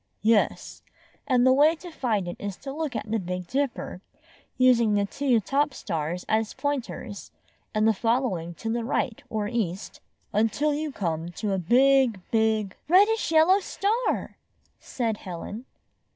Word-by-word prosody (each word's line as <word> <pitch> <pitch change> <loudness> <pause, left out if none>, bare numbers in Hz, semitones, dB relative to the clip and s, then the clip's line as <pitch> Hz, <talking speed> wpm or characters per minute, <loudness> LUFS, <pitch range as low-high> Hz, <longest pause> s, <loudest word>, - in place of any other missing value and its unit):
"Yes; 220 -1 +1 0.5
and 250 -3 +3
the 260 - +6
way 300 +4 +5
to 350 +2 -11
find 220 - -1
it 175 - -4
is 200 -2 -5
to 270 -1 -7
look 300 -4 -3
at 215 -1 -4
the 225 - +1
Big 180 -1 -4
Dipper, 260 -5 -3 0.6
using 240 -4 +4
the 200 0 +2
two 255 +2 +1
top 280 +6 0
stars 165 +3 -3
as 220 0 0
pointers, 275 -7 -4 0.5
and 215 0 +3
following 225 -7 -1
to 225 - -4
the 235 0 -1
right 235 -1 -1
or 215 -2 -2
east, 205 -5 -3 0.3
until 225 +8 +1
you 300 +1 -3
come 165 -7 -3
to 205 +3 -2
a 190 - 0
big, 255 +3 +4
big, 220 -3 +1
— - - -43
" - - -45
"Reddish 405 +3 +4
yellow 330 +5 +5
star!" 425 +5 -1 0.4
said 230 -4 -2
Helen. 200 +6 -7
230 Hz, 155 wpm, -26 LUFS, 205-275 Hz, 0.6 s, the